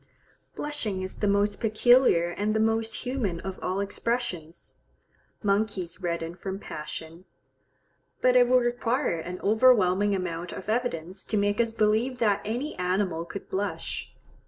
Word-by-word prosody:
Blushing 225 -11 -2
is 185 - -6
the 205 - 0
most 200 0 +2
peculiar 225 -5 +4
and 210 +4 -1
the - - +2
most 225 +1 0
human 240 -10 -1
of 190 -1 -6
all 185 +2 -1
expressions. 200 -5 -3 0.7
Monkeys 200 -4 0
redden 170 -1 -2
from 190 +2 -5
passion, 165 0 -8 0.9
but 255 0 +3
it 245 -1 +6
would 250 0 +4
require 240 - 0
an 180 +3 -6
overwhelming 205 -3 +4
amount 175 -2 -4
of 190 - -7
evidence 190 -6 -2
to 215 - -2
make 205 +2 +2
us 230 -1 0
believe 225 +3 +1
that 210 -5 +2
any 245 +8 -3
animal 180 -2 0
could 200 - -8
blush. 200 +2 -3
205 Hz, 140 wpm, -27 LUFS, 180-230 Hz, 0.9 s, it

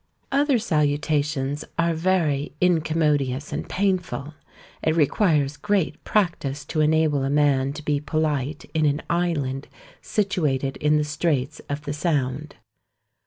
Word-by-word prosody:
Other 280 -1 +3
salutations 150 - 0
are 170 0 +2
very 160 -5 0
incommodious 155 -5 +1
and - - -4
painful; 185 -7 -1 0.5
it 160 - +1
requires 150 -3 +2
great 200 +1 -1
practice 165 -8 0
to 155 - -1
enable 155 -2 +2
a 135 - 0
man 140 -2 +2
to 150 +1 -8
be 145 -1 +1
polite 150 -1 -1
in 155 -2 +2
an 145 +1 0
island 145 -6 -1 0.3
situated 150 -10 0
in 150 +1 +2
the 150 - +2
straits 150 -1 -1
of 145 +1 -3
the 145 - -3
Sound. 145 -2 -1
150 Hz, 125 wpm, -24 LUFS, 145-165 Hz, 0.5 s, Other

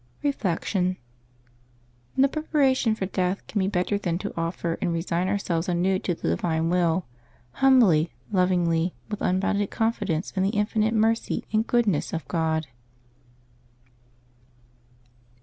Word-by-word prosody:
Reflection. 185 - 0 0.6
— 120 0 -35
ISTo 270 +1 +6
preparation 270 -6 +1
for 195 - -3
death 185 0 -1
can 210 - -2
be 190 - +1
better 195 +1 0
than 170 -4 -1
to 205 +2 -5
offer 165 0 -2
and 180 - 0
resign 170 +2 -1
ourselves 185 -3 -1
anew 185 +2 +1
to 175 - -2
the 80 - -3
Divine 160 - 0
Will 175 0 +1 0.2
— 120 +1 -33
humbly, 220 - +5 0.2
lovingly, 180 -3 +1 0.2
with 210 - -4
unbounded 195 +2 +1
confidence 215 -7 -1
in 190 - -2
the 195 - +2
infinite 215 +1 +1
mercy 225 +1 +1
and 220 +1 +2
goodness 225 - +1
of 165 - -4
God. 160 -2 0
185 Hz, 130 wpm, -25 LUFS, 165-210 Hz, 0.6 s, ISTo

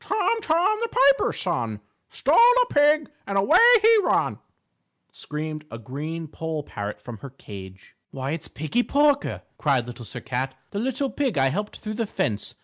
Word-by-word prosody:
"Tom, 440 +2 0
Tom, 370 +5 +2
the 465 - -1
Piper's 275 0 +3
Son, 120 - -2 0.3
Stole - - +1
a - - +5
pig 295 +1 +3 0.2
and 195 0 -1
away 250 - +4 0.2
he 450 +1 +6
run," - - +1 0.7
screamed 155 0 -6
a 115 - -7
green 150 +8 -6
poll 160 0 -5
parrot 105 -5 -6
from 115 +1 -9
her 140 - -9
cage. 95 -7 -12
"Why, 135 0 -5
it's 160 0 -5
Piggie 155 +11 -1
Porker," 285 +2 +1 0.2
cried 135 -6 +1
Little 120 -1 -9
Sir 125 - -8
Cat, 130 +1 -3 0.2
"the 200 - -3
little 265 +3 -2
pig 265 - -1
I 135 0 +3
helped 205 +9 -4
through 215 -1 -6
the 225 0 -2
fence. 105 - -3
165 Hz, 170 wpm, -24 LUFS, -, 0.7 s, he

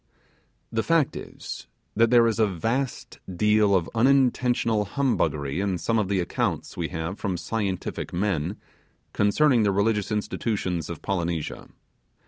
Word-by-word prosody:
The 115 - +1
fact 165 0 +2
is, - - -8 0.3
that 115 +2 +4
there 120 -1 +6
is 115 -1 0
a 110 - +4
vast 115 +9 -3 0.2
deal 105 0 +4
of 85 -3 +1
unintentional 125 -3 +2
humbuggery 85 - 0
in 95 -2 0
some 115 +6 0
of 105 - 0
the 100 -1 0
accounts 85 - -2
we 85 -2 -2
have 80 +3 -5
from 95 -4 -2
scientific 100 -1 -3
men 90 -1 -1 0.6
concerning 120 +5 +3
the 105 -2 +3
religious 105 +1 +1
institutions 105 -5 -2
of 85 - -7
Polynesia. 85 -4 -2
105 Hz, 135 wpm, -25 LUFS, 90-115 Hz, 0.6 s, there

